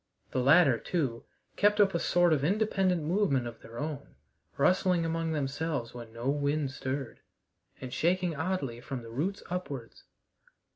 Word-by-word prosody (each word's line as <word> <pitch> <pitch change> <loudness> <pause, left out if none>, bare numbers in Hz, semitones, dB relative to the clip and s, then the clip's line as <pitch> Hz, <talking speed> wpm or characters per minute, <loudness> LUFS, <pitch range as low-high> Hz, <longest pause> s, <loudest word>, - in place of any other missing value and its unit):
The 130 - 0
latter, 140 -2 +5
too, 135 -10 -2 0.3
kept 210 +1 +3
up 200 -2 +5
a 170 - +1
sort 175 -1 +3
of 140 -3 +1
independent 190 -1 +1
movement 160 -6 +1
of 120 -1 -8
their 115 +1 -11
own, 145 - -5 0.4
rustling 180 -2 +3
among 165 0 -1
themselves 145 -3 -2
when 120 -2 -9
no 115 +2 -5
wind 145 0 0
stirred, 130 -1 -4 0.6
and 130 -1 -7
shaking 175 +3 +1
oddly 145 -7 -2
from 120 0 -5
the 115 - -10
roots 170 +12 -2
upwards. 140 -10 -5
150 Hz, 150 wpm, -30 LUFS, 130-180 Hz, 0.6 s, latter